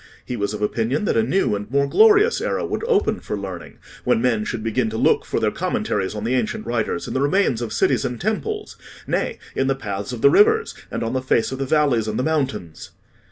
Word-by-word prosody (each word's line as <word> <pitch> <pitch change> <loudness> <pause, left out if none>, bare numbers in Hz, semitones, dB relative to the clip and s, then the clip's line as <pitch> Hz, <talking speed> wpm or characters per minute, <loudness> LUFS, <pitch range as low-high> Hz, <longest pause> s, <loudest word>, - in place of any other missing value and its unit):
He 125 - -4
was 100 -1 -2
of 105 - -4
opinion 120 - 0
that - - +1
a - - +4
new 195 - +1
and 105 +1 -6
more 140 +2 +2
glorious 435 - +5
era - - -1
would - - -3
open 405 - +2
for 105 - -4
learning 95 -4 -7 0.3
when - - +2
men 115 -3 +1
should 110 -1 -4
begin 115 +1 0
to 110 - -4
look - - +2
for - - -1
their - - +1
commentaries 95 +2 -2
on 105 - -4
the 120 +3 0
ancient 125 -4 -1
writers 115 -6 -2
in - - -5
the 130 - 0
remains 145 - +2
of 115 -2 -4
cities 115 +2 +1
and 125 -1 -3
temples, 415 - -3 0.3
nay, - - -1 0.2
in 135 - +1
the 135 - +1
paths 100 -4 -5
of 120 -2 -6
the 140 - +7
rivers, 445 +1 +4 0.2
and - - -3
on 115 +2 -2
the 130 - 0
face 130 -2 +1
of 130 - -5
the 135 - -2
valleys 140 -7 +2
and 110 - -2
the 125 - 0
mountains." 130 - -2
125 Hz, 235 wpm, -22 LUFS, 110-150 Hz, 0.3 s, the